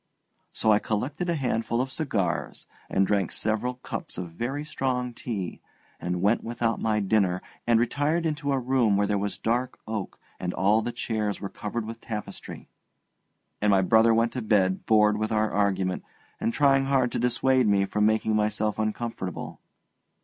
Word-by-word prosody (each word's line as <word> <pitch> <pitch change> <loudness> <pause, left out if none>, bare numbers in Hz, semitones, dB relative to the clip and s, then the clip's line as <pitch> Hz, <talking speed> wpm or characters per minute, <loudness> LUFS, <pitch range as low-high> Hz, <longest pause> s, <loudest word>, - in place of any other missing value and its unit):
So 110 - +2
I 105 - +5
collected 140 +13 -2
a 170 - +1
handful 115 -4 -1
of 130 +1 -1
cigars 100 - -2 0.2
and 95 - +3
drank 100 -2 +1
several 110 +3 -1
cups 125 - -6
of 90 -2 -5
very 130 - -3
strong 125 -4 -2
tea, 105 -7 -5 0.4
and 90 +1 -2
went 105 +4 +3
without 115 0 -1
my 110 -1 +1
dinner, 95 -3 +2 0.3
and 115 -1 +5
retired 145 +7 +1
into 150 -2 -1
a 135 - +2
room 125 -5 +2
where 100 - +3
there 100 0 0
was 100 0 -3
dark 120 +3 -1
oak 110 -3 -4 0.2
and 90 -1 -3
all 100 +5 +3
the 120 - -3
chairs 110 -4 -2
were 100 - -5
covered 110 +3 -4
with 115 +1 -7
tapestry; 105 -2 -7 0.9
and 105 - +3
my 95 -1 +4
brother 110 +4 +5
went 115 +1 +3
to 125 - -3
bed 95 -4 +1
bored 105 -1 +5
with 110 +1 -1
our 110 0 +1
argument, 95 -2 0 0.4
and 115 - 0
trying 135 0 +3
hard 130 -3 +2
to - - -1
dissuade 125 +1 +2
me 100 -1 +3
from 105 +1 +2
making 110 0 +1
myself 105 0 0
uncomfortable. 110 -4 -4
110 Hz, 170 wpm, -26 LUFS, 105-125 Hz, 0.9 s, I